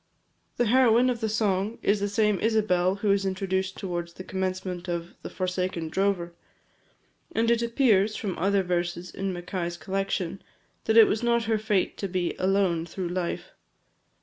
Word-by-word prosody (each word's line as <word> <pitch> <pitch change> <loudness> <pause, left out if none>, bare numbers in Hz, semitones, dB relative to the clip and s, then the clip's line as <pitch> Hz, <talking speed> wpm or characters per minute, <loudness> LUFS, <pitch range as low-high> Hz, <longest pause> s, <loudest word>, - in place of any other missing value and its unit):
The 240 - +2
heroine 250 +1 +4
of 240 - -3
the 220 - 0
song 210 0 0
is 205 +1 +2
the 205 0 -1
same 210 -1 +2
Isabel 195 -5 +2
who 205 0 0
is 200 0 +2
introduced 190 0 -2
towards 175 -2 -4
the 185 - -9
commencement 185 -1 -3
of 170 0 -4
the - - -7
"Forsaken 180 -3 -2
Drover;" 185 -1 0 1.0
and 230 -2 +2
it 235 0 +2
appears, 230 -4 +3
from 195 -4 -3
other 195 +2 +2
verses 175 0 -2
in 195 0 -3
Mackay's 175 -1 -4
collection, 190 +1 -2 0.4
that 220 - +3
it 225 - +10
was 215 - 0
not 235 -1 +2
her 220 -1 0
fate 210 -3 0
to 200 - -3
be 180 -2 -2
"alone" 185 -3 +2
through 180 +1 -4
life. 180 -1 -3
195 Hz, 165 wpm, -26 LUFS, 180-215 Hz, 1.0 s, it